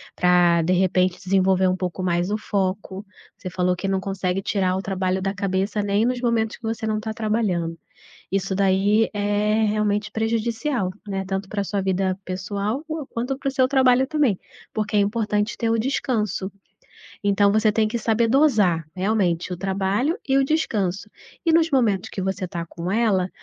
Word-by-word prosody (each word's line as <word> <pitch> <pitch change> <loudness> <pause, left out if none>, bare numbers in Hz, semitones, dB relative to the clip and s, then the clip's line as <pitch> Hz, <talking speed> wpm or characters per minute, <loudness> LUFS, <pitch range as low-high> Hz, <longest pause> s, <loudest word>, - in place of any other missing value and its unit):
pra 175 -1 +4
de 180 +3 +1
repente 185 0 +2
desenvolver 190 0 +3
um 185 - +2
pouco 185 0 -4
mais 175 0 0
o 210 - 0
foco, 195 -1 -2 0.3
você 185 - -7
falou 180 0 0
que 195 +2 -4
não 190 0 +1
consegue 195 -1 -2
tirar 190 -2 0
o 190 - -2
trabalho 190 -1 -1
da 195 +1 -1
cabeça 195 +1 -1
nem 205 +2 +1
nos 250 0 -1
momentos 230 -3 0
que - - -35
você 225 0 -3
não 215 -1 0
tá 220 0 -4
trabalhando, 210 -7 -1 0.6
isso 195 0 0
daí 200 +3 +3
é 205 +1 +1
realmente 210 0 0
prejudicial, 225 0 -1 0.2
né, 195 -1 -3
tanto 195 +1 -3
pra 205 -1 -2
sua 200 0 -2
vida 190 0 0
pessoal 200 +8 -3 0.3
quanto 250 +3 -3
para - - -10
o - - +1
seu 260 -1 +3
trabalho 260 -1 +4
também. 280 - +1 0.3
Porque 210 -1 -1
é - - +5
importante 210 0 0
ter 230 -2 -1
o 230 - +2
descanso, 220 -5 -1 0.7
então 200 0 +3
você 215 +1 +3
tem 215 +1 +2
que 215 - -2
saber 225 +1 +1
dosar 220 - +3
realmente 185 -3 0
o 180 - -3
trabalho 195 - 0
e 270 - +3
o 275 - +4
descanso 210 - -1 0.4
e 330 - +4
nos 330 0 +4
momentos 225 - +1
que - - -5
você 190 -1 -2
tá 170 -1 -5
com 170 +2 -5
ela, 200 -4 +2
200 Hz, 180 wpm, -23 LUFS, 190-225 Hz, 0.7 s, é